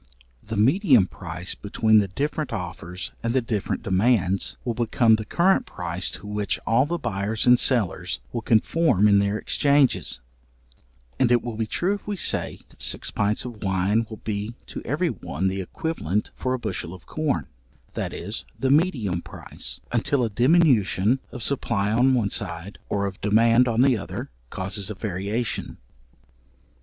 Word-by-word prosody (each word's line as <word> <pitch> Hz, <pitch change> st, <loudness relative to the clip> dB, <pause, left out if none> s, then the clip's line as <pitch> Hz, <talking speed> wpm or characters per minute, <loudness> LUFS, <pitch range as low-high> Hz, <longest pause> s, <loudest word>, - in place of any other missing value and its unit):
The 110 Hz, 0 st, -5 dB
medium 130 Hz, -, +5 dB
price 90 Hz, 0 st, -5 dB
between 110 Hz, +1 st, +3 dB
the 100 Hz, -, +1 dB
different 145 Hz, -, -2 dB
offers 90 Hz, -3 st, -5 dB
and 115 Hz, +2 st, 0 dB
the -, -, +5 dB
different 110 Hz, -4 st, -2 dB
demands, 95 Hz, -1 st, +1 dB
will 120 Hz, -, 0 dB
become 115 Hz, 0 st, +3 dB
the 110 Hz, -, -5 dB
current 185 Hz, -, +2 dB
price 90 Hz, +1 st, -4 dB
to -, -, -14 dB
which 105 Hz, 0 st, -2 dB
all 130 Hz, +5 st, +3 dB
the 175 Hz, +2 st, -1 dB
buyers 110 Hz, -, -2 dB
and 125 Hz, -1 st, +6 dB
sellers 95 Hz, -7 st, +1 dB
will 120 Hz, -, -2 dB
conform 110 Hz, -, +3 dB
in 100 Hz, -1 st, +5 dB
their 100 Hz, +1 st, +1 dB
exchanges; 140 Hz, -, +2 dB, 1.0 s
and 120 Hz, -, +3 dB
it 120 Hz, -, +4 dB
will 120 Hz, -2 st, -4 dB
be 110 Hz, 0 st, -2 dB
true 180 Hz, -, 0 dB
if 205 Hz, -, -7 dB
we 205 Hz, -, -1 dB
say, -, -, -2 dB
that -, -, -12 dB
six -, -, -1 dB
pints 105 Hz, +3 st, 0 dB
of 120 Hz, -4 st, -8 dB
wine 100 Hz, +4 st, +1 dB
will 110 Hz, -, -7 dB
be 105 Hz, +2 st, -3 dB
to -, -, -7 dB
every -, -, 0 dB
one 95 Hz, +3 st, -3 dB
the 95 Hz, +1 st, -3 dB
equivalent 105 Hz, -, -2 dB
for 130 Hz, 0 st, -1 dB
a -, -, -3 dB
bushel 95 Hz, -6 st, -4 dB
of 90 Hz, -, -15 dB
corn, 145 Hz, -, -1 dB, 0.5 s
that -, -, -3 dB
is, 105 Hz, +5 st, -4 dB
the 135 Hz, 0 st, +1 dB
medium 130 Hz, -, +2 dB
price, -, -, -8 dB
until 135 Hz, +3 st, +1 dB
a 110 Hz, -, -3 dB
diminution 125 Hz, -, +3 dB
of 125 Hz, -, -6 dB
supply 105 Hz, -7 st, 0 dB
on 130 Hz, +4 st, +4 dB
one 105 Hz, -5 st, 0 dB
side, 90 Hz, +3 st, -3 dB
or 100 Hz, 0 st, 0 dB
of 100 Hz, -1 st, -6 dB
demand 115 Hz, +4 st, +4 dB
on 115 Hz, 0 st, +2 dB
the 130 Hz, -1 st, +5 dB
other, 100 Hz, -, -6 dB, 0.2 s
causes 95 Hz, -, -2 dB
a 110 Hz, -, -4 dB
variation. 105 Hz, +4 st, -3 dB
110 Hz, 170 wpm, -24 LUFS, 100-125 Hz, 1.0 s, and